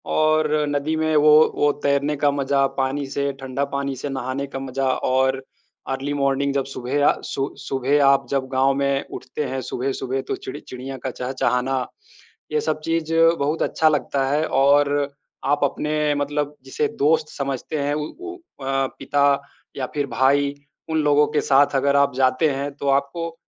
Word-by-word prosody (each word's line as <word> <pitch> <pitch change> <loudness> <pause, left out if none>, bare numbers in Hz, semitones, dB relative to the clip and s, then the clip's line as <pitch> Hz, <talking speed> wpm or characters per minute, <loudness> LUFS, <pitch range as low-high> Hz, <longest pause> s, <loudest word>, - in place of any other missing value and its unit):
और 155 0 +3 0.2
नदी 145 +2 -1
में 155 0 0
वो 150 0 +6 0.2
वो 145 0 +3
तैरने 140 +1 +1
का 145 0 +2
मज़ा, 140 0 +1
पानी 135 +1 -2
से 140 +1 -1
ठंडा 135 +1 -2
पानी 140 -1 -2
से 140 +3 -5
नहाने 135 +1 -3
का 135 - -6
मज़ा, 135 0 -2
और 130 +1 +1 0.5
अर्ली 135 +2 -2
मॉर्निंग 140 0 +1
जब 140 -1 0
सुबह 135 +2 -1
आ - - +5
सु 135 +1 -2
सुबह 140 0 +1
आप 135 0 +4
जब 135 -1 -1
गाँव 135 +1 +3
में 140 0 0
उठते 150 - -5
हैं 130 0 -3
सुबह-सुबह, 130 +1 -3
तो - - -3
चिड़ - - -7
चिड़िया 130 0 -8
का 130 - -1
चहचहाना, 125 0 -1 0.7
ये 455 - +1
सब 435 - -1
चीज़ 165 -1 -1 0.3
बहुत 150 +3 -1
अच्छा 160 - +2
लगता 140 -2 0
है 150 +3 +1
और 140 +1 +4 0.5
आप 145 +2 +1
अपने 150 +1 0
मतलब 145 +1 -2
जिसे 220 +12 -1
दोस्त 155 +1 +2
समझते 140 +2 -3
हैं, 145 +1 0
उ 150 0 -2
उ 365 0 -7 0.3
अ, 135 0 +1
पिता 140 0 +2 0.4
या 130 - -1
फिर 145 -1 0
भाई, 140 +2 +2 0.4
उन 160 - 0
लोगों 150 0 +4
के - - +2
साथ 140 +1 +3
अगर 140 +1 +2
आप 140 -1 +3
जाते 130 +4 +3
हैं, 140 +1 -3
तो 140 - -5
आपको 140 +5 -1
140 Hz, 175 wpm, -22 LUFS, 135-145 Hz, 0.7 s, वो